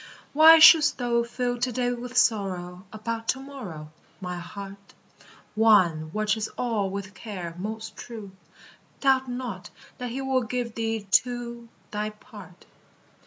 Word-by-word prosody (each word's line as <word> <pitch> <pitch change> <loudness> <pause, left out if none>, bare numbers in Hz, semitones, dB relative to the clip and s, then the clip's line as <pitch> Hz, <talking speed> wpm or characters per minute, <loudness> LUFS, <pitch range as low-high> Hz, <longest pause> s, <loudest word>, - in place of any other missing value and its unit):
Why 320 +2 +9
shouldst 315 -2 +8
thou 240 -2 +1
fill 245 +1 -3
to 250 +1 0
day 245 0 -1
with 245 +1 -6
sorrow 185 -5 0
About 225 +1 -5
to 260 - 0
morrow. 205 - -9 0.3
My 180 -2 -5
heart? 195 +2 -10 0.6
One 185 -8 +3
watches 215 +2 -1
all 220 -5 -1
with 200 +1 -6
care 185 -7 -7
most 220 +2 -6
true; 220 -5 -9 0.7
Doubt 265 -2 +2
not 245 -7 -6 0.3
that 250 -1 -4
he 250 +3 -5
will 265 -1 0
give 240 0 -3
thee 225 -2 -3
too 235 0 0 0.2
Thy 210 0 -2
part. 210 0 -14
225 Hz, 135 wpm, -26 LUFS, 200-245 Hz, 0.7 s, Why